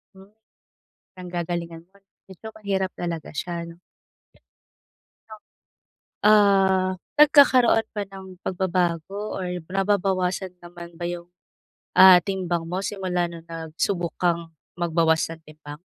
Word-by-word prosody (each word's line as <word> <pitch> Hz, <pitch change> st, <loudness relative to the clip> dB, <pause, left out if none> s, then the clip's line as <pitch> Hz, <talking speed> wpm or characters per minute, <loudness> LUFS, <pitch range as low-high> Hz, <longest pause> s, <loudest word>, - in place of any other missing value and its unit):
Hmm, 190 Hz, +1 st, -16 dB, 0.9 s
ang 180 Hz, -, -8 dB
gagalingan 170 Hz, -1 st, -4 dB
nun, 195 Hz, +2 st, -27 dB, 0.4 s
so 220 Hz, -, -8 dB
mahirap 195 Hz, -3 st, -2 dB
talaga 170 Hz, -3 st, -4 dB
siya, 170 Hz, +2 st, -4 dB
'no? 170 Hz, +1 st, -13 dB, 2.5 s
Ah, 195 Hz, -3 st, +4 dB, 0.2 s
nagkakaroon 280 Hz, -6 st, +5 dB
ba 210 Hz, -, -3 dB
ng 190 Hz, -2 st, -12 dB
pagbabago 185 Hz, +2 st, -2 dB
or 185 Hz, -, -4 dB, 0.2 s
nababawasan 190 Hz, -1 st, -1 dB
naman 175 Hz, -1 st, -12 dB
ba 175 Hz, -, -5 dB
yung, 175 Hz, 0 st, -6 dB, 0.7 s
ah, 185 Hz, -2 st, +9 dB
timbang 180 Hz, -4 st, -2 dB
mo 180 Hz, +3 st, -4 dB
simula 185 Hz, -3 st, -2 dB
nung 170 Hz, -1 st, -10 dB
nagsubok 165 Hz, +2 st, -3 dB
kang 170 Hz, -2 st, 0 dB, 0.3 s
magbawas 165 Hz, -1 st, +2 dB, 0.2 s
ng 160 Hz, -, -24 dB
timbang? 150 Hz, -1 st, -12 dB
180 Hz, 110 wpm, -24 LUFS, 170-195 Hz, 2.5 s, ah